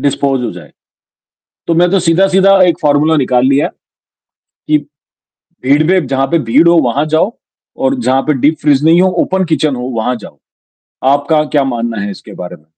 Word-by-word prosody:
Dispose 135 -2 -1
हो - - -3
जाए। - - -13 1.0
तो 170 - +1
मैं 175 +1 +3
तो 195 - +2
सीधा-सीधा 190 +3 +3
एक 175 -2 +2
फॉर्मूला 150 +2 +2
निकाल 125 -2 +1
लिया 140 +2 +2
है। - - -5 1.0
कि 150 0 +3 0.9
भीड़ 140 +3 +3
में 185 -6 +1
जहाँ 135 0 -1
पे 170 - +3
भीड़ 165 - +4
हो 170 - +4
वहाँ 135 +5 0
जाओ 185 +8 +1 0.5
और 265 - +1
जहाँ 135 - +1
पे 155 - 0
डीपफ्रीज़ 145 -1 +1
नहीं 165 +2 +4
हो, 185 - +3
ओपन 190 +1 -1
किचन 155 -4 -1
हो 125 - -6
वहाँ 120 +2 -1
जाओ। 110 - -13 0.7
आपका 145 +2 +1
क्या 145 -2 +3
मानना 120 -3 -3
है 100 0 -4
इसके - - -11
बारे 90 0 -8
में? 75 - -27
145 Hz, 185 wpm, -13 LUFS, 130-170 Hz, 1.0 s, भीड़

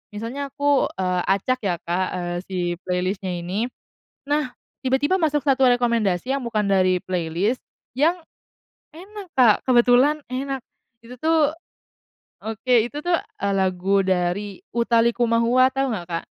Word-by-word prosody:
misalnya 240 +7 -4
aku, 285 -1 +2
eee, 180 -1 0
acak 200 +7 +1
ya 180 -3 +1
Kak, 180 +2 -1
eee, 175 -1 -3
si 190 -1 -5 0.3
playlist-nya 185 +1 -1
ini. 185 +7 -2 0.6
Nah, 290 -3 +1 0.4
tiba-tiba 285 +8 +2
masuk 300 -4 +1
satu 270 -1 +3
rekomendasi 235 -5 +1
yang 265 - -6
bukan 220 -2 0
dari 185 -2 +3
playlist 180 +6 -1 0.4
yang 335 +5 +2 0.7
enak 390 +4 -10
Kak, 240 -5 +6
kebetulan 255 +4 +4
enak. 270 +1 -3 0.4
Itu 235 +2 -12
tuh 315 -1 +3 0.9
oke, 225 +3 -1
itu 290 +5 -5
tuh, 350 +2 +1
e 200 - -6
lagu 190 +1 +1
dari 185 +2 -1 0.2
Utha 235 0 +3
Likumahua, 235 +2 +3
tahu 270 0 0
nggak 180 -6 -4
Kak? 165 - -2
235 Hz, 135 wpm, -22 LUFS, 190-270 Hz, 0.9 s, Kak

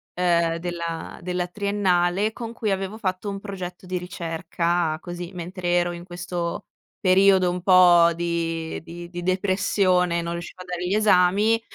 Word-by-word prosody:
uhm, 170 -2 +2
della 170 -2 -5
della 180 0 -2
triennale, 200 0 +1
con 230 0 -7
cui 215 -3 -2
avevo 195 +2 -2
fatto 190 -1 -3
un 195 0 -5
progetto 185 -3 -7
di 185 0 -3
ricerca 170 -1 -2
così, 175 0 -7
mentre 180 +1 -6
ero 175 0 +2
in 175 0 -8
questo 175 -1 -4 0.3
periodo 190 -1 +5
un 180 - -4
po' 175 -2 +6
di 165 -1 -2
di 170 +1 -9
di 175 0 -6
depressione, 185 -1 +1
non 170 0 -3
riuscivo 170 +1 -7
a 185 - -9
dare 180 -1 -4
gli 195 - +1
esami, 210 +2 +4
180 Hz, 155 wpm, -24 LUFS, 170-190 Hz, 0.3 s, po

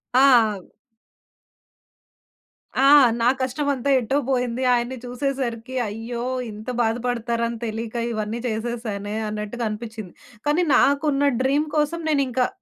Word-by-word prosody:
ఆ! - - +7 0.4
అవ్ 180 - -14 2.2
ఆ! - - +7 0.3
నా 235 - +3
కష్టమంతా 280 +1 -1
ఎటో 260 +4 -1
బోయింది 250 -1 0
ఆయన్ని 245 +2 -1
చూసేసరికి 255 -1 -3
అయ్యో! 230 +3 -5 0.3
ఇంత 215 +3 -8
బాధపడతారని 235 0 -1
తెలీక 225 +1 -5 0.2
ఇవన్నీ 215 +1 -3
చేసేసానే 220 -2 -3
అన్నట్టుగా 210 +3 -4
అనిపిచ్చింది. 220 -3 -7 0.4
కానీ, 305 +5 +3
నాకున్న 285 0 +3
డ్రీమ్ 285 +4 +1
కోసం 315 +3 0
నేనింకా 260 -4 +1
240 Hz, 105 wpm, -23 LUFS, 225-270 Hz, 2.2 s, ఆ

